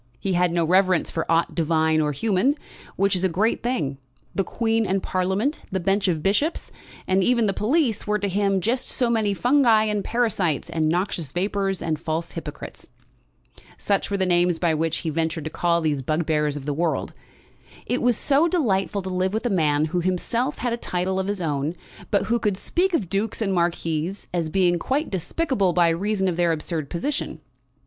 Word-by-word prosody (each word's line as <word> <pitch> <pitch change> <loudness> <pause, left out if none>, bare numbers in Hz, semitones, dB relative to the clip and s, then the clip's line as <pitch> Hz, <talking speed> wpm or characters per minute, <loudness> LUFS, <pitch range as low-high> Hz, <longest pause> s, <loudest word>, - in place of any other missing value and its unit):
He 195 - -1
had 180 0 +3
no 170 -1 +1
reverence 185 +1 +3
for 165 - -2
aught 165 +1 +2
divine 160 -1 +2
or 150 -1 +1
human, 215 - +1 0.4
which 195 0 +2
is 180 - -1
a 190 - +3
great 205 +7 +1
thing. 155 - -2 0.3
The 195 - +1
Queen 225 +3 0
and 190 0 0
Parliament, 190 +10 0
the 190 - 0
bench 195 +3 +1
of 160 -4 0
bishops, 250 - 0 0.3
and 190 0 +2
even 235 0 +3
the 200 - +1
police, 235 - 0
were 210 0 +2
to 205 -1 -2
him 195 0 +1
just 240 +6 -1
so 245 -2 +1
many 215 -3 +1
fungi 245 -2 +4
and 210 -2 -1
parasites, 205 - 0
and 155 -1 +1
noxious 170 -4 -1
vapours, 195 +1 -1
and 155 -2 -1
false 165 +1 -3
hypocrites. - - -8 0.9
Such 200 -1 0
were 200 - -1
the 190 - +1
names 175 -1 +2
by 165 -1 +1
which 160 +1 0
he 160 - 0
ventured 160 0 -1
to 155 - -5
call 170 -1 +1
these 150 -4 0
bugbears 150 0 0
of 140 - -8
the 145 - -1
world. 165 +2 -1 0.7
It 245 - -1
was 245 -2 +3
so 290 +4 +3
delightful 205 - 0
to 190 - -4
live 185 +2 0
with 225 - -2
a 240 - +1
man 155 -5 +2
who 175 +3 -1
himself 230 - -1
had 245 -1 -1
a - - -1
title 185 -3 -2
of 190 - -2
his 200 -3 -2
own, 150 +1 -1 0.3
but 200 -2 +2
who 235 +1 0
could 205 -4 0
speak 360 - 0
of 200 - -1
dukes 200 +5 -2
and 200 -4 0
marquises 170 +1 -1
as 170 -3 -1
being 175 0 +2
quite 285 - -1
despicable 195 - 0
by 175 -1 +4
reason 190 +3 0
of 175 -2 -1
their 170 -1 +3
absurd 155 -1 -4
position. 275 - -3
185 Hz, 195 wpm, -24 LUFS, 165-215 Hz, 0.9 s, fungi